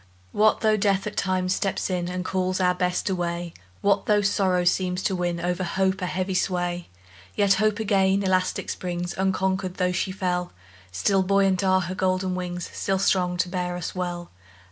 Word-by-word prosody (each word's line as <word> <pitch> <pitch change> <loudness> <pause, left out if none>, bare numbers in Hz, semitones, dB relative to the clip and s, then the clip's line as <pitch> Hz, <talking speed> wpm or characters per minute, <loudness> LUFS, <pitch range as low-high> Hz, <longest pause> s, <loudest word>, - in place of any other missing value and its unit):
What 215 +1 +3
though 215 -1 +3
Death 195 -1 +1
at 210 - -5
times 185 -1 0
steps 195 0 -1
in, 180 -2 -2
And 180 0 -4
calls 185 0 -1
our 180 -1 +3
Best 180 0 -1
away? 175 -2 -2 0.3
What 200 -1 +2
though 210 -1 +4
sorrow 190 -3 +2
seems 180 +1 +1
to 190 - 0
win, 175 -1 -1
O'er 175 +1 0
hope, 190 +2 -1
a 180 - -1
heavy 185 +1 -2
sway? 175 -1 -1 0.5
Yet 200 -1 +4
Hope 215 -1 +2
again 195 -2 +2
elastic 185 -1 0
springs, 175 -1 -4
Unconquered, 190 -1 0
though 180 -1 +1
she 185 +1 -1
fell; 180 -2 -2 0.4
Still 190 - +2
buoyant 195 0 +2
are 190 0 +3
her 180 +1 -4
golden 185 0 0
wings, 180 -1 -4
Still 195 -1 -1
strong 180 -2 +1
to 180 - +1
bear 180 -1 -2
us 175 - -4
well. 175 -1 -4
185 Hz, 180 wpm, -25 LUFS, 180-190 Hz, 0.5 s, though